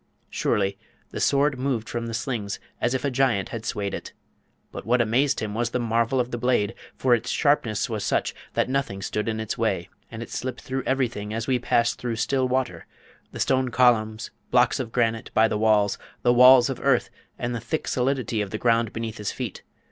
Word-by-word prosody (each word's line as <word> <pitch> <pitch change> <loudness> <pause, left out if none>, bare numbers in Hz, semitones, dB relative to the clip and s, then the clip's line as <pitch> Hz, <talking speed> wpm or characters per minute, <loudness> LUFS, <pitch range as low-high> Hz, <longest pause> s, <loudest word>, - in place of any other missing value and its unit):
Surely, 100 0 0 0.3
the - - -5
Sword 140 -1 +2
moved 125 -4 -1
from 120 -1 -3
the 115 - -3
slings 115 -6 -3 0.2
as 120 +2 +1
if 130 - -2
a 140 - 0
giant 125 -7 +1
had 115 0 -6
swayed 100 -1 -2
it! - - -6 0.6
But - - -7
what 125 +2 +2
amazed 125 +5 +2
him 105 -2 -3
was 115 +1 0
the 125 - -1
marvel 115 +2 +1
of 125 0 -1
the 120 - -3
blade, 120 -5 +1 0.2
for 130 -2 +2
its 120 +1 0
sharpness 130 -8 +1
was - - -3
such - - 0 0.2
that - - +2
nothing 125 -7 -2
stood 105 +3 -2
in 110 0 -2
its 110 -1 -4
way, - - 0 0.2
and 115 0 -6
it - - -12
slipped 130 -1 -4
through 130 0 -3
everything 115 -5 -1
as 115 0 -2
we 130 -2 +1
pass 115 -1 +2
through 120 -2 -4
still 130 +2 +1
water, 125 -10 -2 0.4
the - - -8
stone 130 -1 +2
columns, 115 -3 +2 0.2
blocks 125 +2 +3
of 120 -3 -4
granite 115 -2 0
by 110 0 +5
the 110 - -2
walls, 105 -2 +3 0.2
the 120 - +5
walls 125 0 +8
of - - -4
earth, - - +2 0.3
and 120 0 -3
the 120 - -2
thick 155 - -3
solidity 125 -4 0
of 100 - -3
the 110 - -3
ground 115 -1 +2
beneath 115 -1 -5
his 105 - -2
feet. 125 -7 -5
120 Hz, 210 wpm, -25 LUFS, 110-130 Hz, 0.6 s, walls